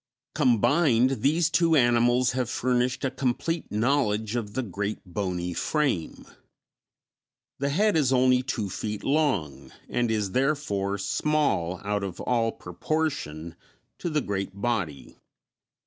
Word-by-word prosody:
Combined, 125 -1 +3
these 160 +4 +2
two 165 +1 +3
animals 120 -1 +3
have 125 -2 -2
furnished 125 +1 0
a 130 - 0
complete 135 +5 -2
knowledge 110 -2 +1
of 105 -3 -4
the 130 - 0
great 100 0 -3
bony 90 -2 -3
frame. 135 - -1 1.3
The 140 +1 0
head 205 +7 +2
is 145 -5 +2
only 130 -1 +4
two 125 -5 -3
feet 105 +2 -5
long, 85 - 0 0.2
and 120 -1 0
is, 105 -3 -1
therefore, 115 -7 0
small 100 - 0
out 105 0 -1
of 95 -3 -5
all 115 -2 +1
proportion 90 - -3 0.4
to 175 - -2
the 155 -2 0
great 100 -2 -4
body. 100 - -3
120 Hz, 125 wpm, -26 LUFS, 100-140 Hz, 1.3 s, only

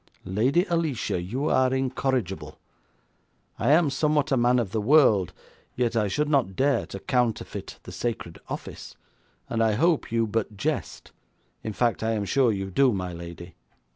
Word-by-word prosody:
'Lady 125 - +2
Alicia, 160 - -1
you 125 - -3
are 130 0 +3
incorrigible. 130 - -2 1.0
I - - +1
am 155 0 +4
somewhat 150 +1 +1
of 135 - +3
a - - +1
man 125 +1 +4
of 115 -6 -1
the 110 -1 -1
world, 110 - +4 0.4
yet 120 -2 0
I 105 -2 +2
should 150 +10 0
not 135 -10 +1
dare 135 0 +1
to 100 - -7
counterfeit 125 0 -2
the - - -10
sacred 110 -8 -4
office, - - -7 0.5
and 115 - -1
I 110 -1 +3
hope 160 +5 +1
you 115 0 +2
but 110 -1 -3
jest. - - -3 0.5
In 110 - -5
fact, 120 +2 0
I 110 +1 0
am 105 -2 -1
sure 125 +3 +3
you 95 -2 -4
do, 135 +5 +4
my 90 -4 -3
lady.' 85 +1 -9
115 Hz, 170 wpm, -26 LUFS, 100-135 Hz, 1.0 s, am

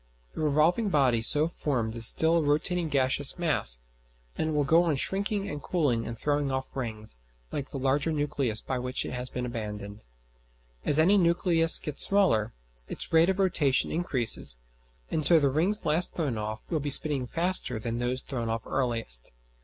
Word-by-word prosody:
The - - -6
revolving 155 +8 +1
body 130 -8 +2
so 150 +7 +3
formed 125 -9 -3
is 115 -1 +7
still 165 +1 +6
a - - +1
rotating 155 +3 -1
gaseous 135 +1 0
mass; 150 - 0 0.5
and 160 - -2
it - - -3
will 150 -1 +1
go 160 +5 +4
on 165 -4 0
shrinking 200 +6 -1
and 145 -1 -6
cooling 140 -10 -1
and 115 0 -6
throwing 145 0 -1
off 130 +1 -5
rings, 110 - -6 0.3
like 140 -2 -5
the - - -7
larger 135 +4 0
nucleus 145 -7 -2
by 130 -2 -4
which 125 +1 -4
it - - -6
has 125 0 -5
been 125 - -5
abandoned. 105 -3 -7 0.8
As 145 - +1
any 190 +6 +4
nucleus 170 -1 +4
gets 150 -2 -2
smaller, 185 - +1 0.4
its - - -4
rate 165 +2 +4
of 190 - 0
rotation 160 -8 +1
increases, 130 - 0 0.5
and 155 - -1
so 170 +2 +6
the 140 -2 +1
rings 175 +9 0
last 160 +3 +2
thrown 145 -8 -2
off 110 0 -5
will 160 - 0
be 145 0 -4
spinning 140 -2 +2
faster 165 -6 +1
than 115 +1 -4
those 125 +1 -3
thrown 120 -4 -4
off 115 0 -4
earliest. 115 - -1
145 Hz, 180 wpm, -27 LUFS, 120-165 Hz, 0.8 s, is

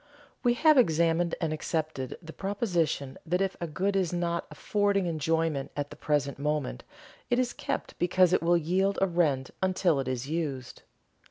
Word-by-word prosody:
We 240 -1 +3
have 310 +1 +5
examined 170 -3 +2
and 160 -3 -1
accepted 155 -4 -3
the 160 0 -9
proposition 175 - -1
that 175 +2 0
if 195 -1 0
a 170 - -2
good 190 +6 -1
is 185 -4 +1
not 170 -1 -1
affording 200 +4 0
enjoyment 160 -3 0
at 145 0 -3
the - - -8
present 145 -2 -1
moment 150 -2 -2 0.5
it 245 - +2
is 250 -1 +1
kept - - -4
because 180 0 +3
it - - +3
will 170 +1 +4
yield 185 +5 +1
a 195 - +4
rent 155 -8 +1
until 185 -5 +2
it 135 - -3
is 130 0 -2
used. 145 -6 -3
170 Hz, 170 wpm, -28 LUFS, 150-190 Hz, 0.5 s, have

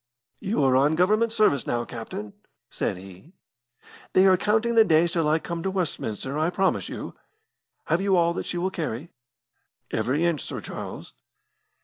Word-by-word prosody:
"You 205 -5 0
are 130 -1 +4
on 145 +4 +3
Government 215 +6 +2
service 210 - +2
now, 120 0 -1
captain," 110 -3 -7 0.4
said - - -2
he. 95 - -13 0.8
"They 185 - +6
are 190 -1 +6
counting 220 +5 +1
the 225 -1 +7
days 165 -3 +3
till 165 -4 +1
I 155 - +3
come 170 +1 -5
to 190 - -1
Westminster, 150 - -3
I 160 +2 +2
promise 190 +1 0
you. - - -6 0.7
Have 170 - +1
you 195 -1 +2
all 170 0 +3
that - - -5
she 175 - -2
will 185 +2 -1
carry?" 155 -3 -4 0.8
"Every 145 +7 0
inch, 170 -5 0
Sir - - -5
Charles." - - -8
170 Hz, 165 wpm, -25 LUFS, 140-190 Hz, 0.8 s, the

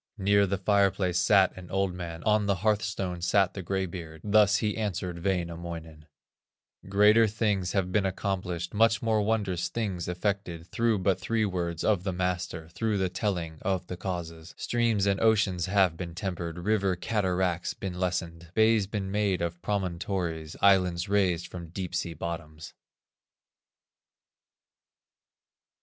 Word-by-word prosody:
Near 100 0 +3
the 100 +1 -1
fireplace 95 -2 +2
sat 95 0 +4
an 90 -1 -10
old 95 -1 0
man, 85 -2 -6
On 105 -1 +2
the 100 - +2
hearthstone 100 -4 0
sat 95 +2 +2
the 95 - -5
gray 95 +2 -1
beard, 80 -3 -8
Thus 105 0 +4
he 105 -2 -1
answered 90 -5 -3
Wainamoinen: 85 -4 -4 0.8
"Greater 105 +3 +6
things 105 -4 0
have 95 -2 0
been 100 0 +2
accomplished, 90 -2 -3
Much 115 +3 +3
more 110 -2 +2
wondrous 100 -5 0
things 100 -7 -3
effected, 90 -2 -2
Through 115 -2 +2
but 95 -1 +2
three 110 +3 0
words 85 -4 -2
of 105 -5 +2
the 95 - -1
master; 90 -3 -2
Through 110 +4 -1
the 95 -1 0
telling 90 -5 -3
of 95 -2 -1
the 90 - -6
causes, 85 -3 -6
Streams 115 -4 +1
and 100 -1 +1
oceans 100 -5 +2
have 95 -4 +3
been 85 -2 -6
tempered, 85 -3 -4
River 100 0 +1
cataracts 90 -3 -1
been 90 -2 -5
lessened, 85 -2 -2
Bays 110 -2 +4
been 100 -2 -3
made 100 -2 +1
of 85 0 -3
promontories, 90 -4 -2
Islands 90 -3 +3
raised 95 -4 +2
from 85 -2 -8
deep 90 +1 -5
sea 85 -1 -2
bottoms." 80 -1 -6
95 Hz, 145 wpm, -28 LUFS, 85-100 Hz, 0.8 s, Greater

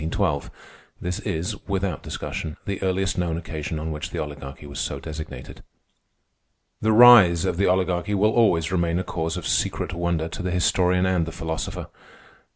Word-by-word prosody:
This 90 0 -3
is, 80 +2 -3
without 95 -1 -1
discussion, 80 -2 -5
the 100 -1 -3
earliest 95 0 0
known 85 -2 -1
occasion 80 -2 -5
on 80 +1 -4
which 75 0 -5
the - - -6
Oligarchy 75 -1 -6
was 70 -1 -7
so - - -2
designated. 80 -5 -8 1.2
The 110 - +2
rise 110 -7 +8
of 90 -2 -1
the 100 - +2
Oligarchy 90 +2 +1
will 105 +2 +3
always 90 -9 +3
remain 85 -2 +1
a 90 - -1
cause 80 -2 -3
of - - -6
secret - - 0
wonder 85 -2 -1
to 85 - -6
the 90 - -2
historian 90 +1 +2
and 90 -3 +1
the - - -4
philosopher. 80 0 -4
85 Hz, 165 wpm, -24 LUFS, 80-95 Hz, 1.2 s, rise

